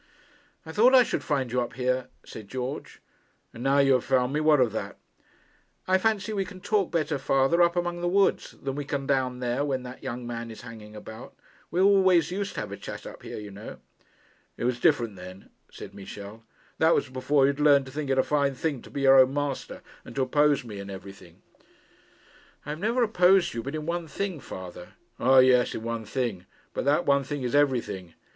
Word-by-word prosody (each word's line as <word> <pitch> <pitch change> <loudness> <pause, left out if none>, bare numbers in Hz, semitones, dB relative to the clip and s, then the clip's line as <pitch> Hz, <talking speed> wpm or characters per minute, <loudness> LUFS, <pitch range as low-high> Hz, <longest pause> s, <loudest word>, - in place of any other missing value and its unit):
'I 160 - -7
thought 240 +9 +5
I 255 - +8
should - - -3
find 135 -5 -1
you 125 0 +1
up 120 - -4
here,' 125 0 -1 0.2
said 110 -2 -10
George. 130 +5 -6 0.5
'And 115 - -10
now 135 +2 +2
you 135 -1 +5
have 130 - +2
found 130 0 +1
me, 150 - +1
what 155 -1 +4
of 125 -4 +3
that?' 110 - -5 0.9
'I 190 0 +3
fancy 220 +1 0
we 195 -2 0
can 185 -1 -11
talk 200 0 0
better, 155 -4 -1
father, 135 +6 +2
up 170 0 +4
among 175 0 -2
the 175 - 0
woods, 195 +2 +1
than 135 - -2
we 145 +1 -4
can 140 -1 -3
down 130 -2 0
there 125 +3 0
when 135 -3 -2
that 125 0 -9
young 120 +1 -5
man 115 -1 -5
is 110 - -10
hanging 110 -3 -11
about. 110 +1 -10 0.3
We 170 - -2
always 190 -4 +4
used 200 +2 -3
to - - -2
have 105 -1 -6
a 100 - -6
chat - - -8
up - - -10
here, - - -8
you 105 -1 -8
know.' 100 +2 -9 0.8
'It - - -5
was 125 0 0
different 120 - +2
then,' 90 +2 -11 0.2
said - - -10
Michel. 100 +2 -10 0.4
'That 160 +1 +5
was - - 0
before 130 +2 +1
you - - +4
had 140 - -9
learned 145 -2 +5
to 130 - -10
think 145 0 -4
it 135 - +1
a 130 - +4
fine 140 -2 +1
thing 140 -2 -2
to - - -14
be 140 - -5
your 135 0 +7
own 130 0 +6
master 145 -2 -3 0.2
and - - -12
to 135 - +1
oppose 145 +2 +2
me 105 -4 -8
in 100 0 -7
everything.' 95 -3 -11 1.2
'I - - -8
have 155 - -5
never 230 +6 +1
opposed 185 -4 +4
you 115 - -3
but 140 +5 -5
in 155 -1 -4
one 170 0 -3
thing, 190 0 -4
father.' 90 -6 -9 0.3
'Ah, 130 +1 +4
yes; 130 -1 +5
in 110 - -5
one 115 -1 -4
thing. 110 -5 -3 0.3
But - - -3
that 145 +5 +2
one 140 0 +3
thing 145 0 -5
is 125 - -2
everything. 120 - 0
135 Hz, 220 wpm, -27 LUFS, 120-160 Hz, 1.2 s, I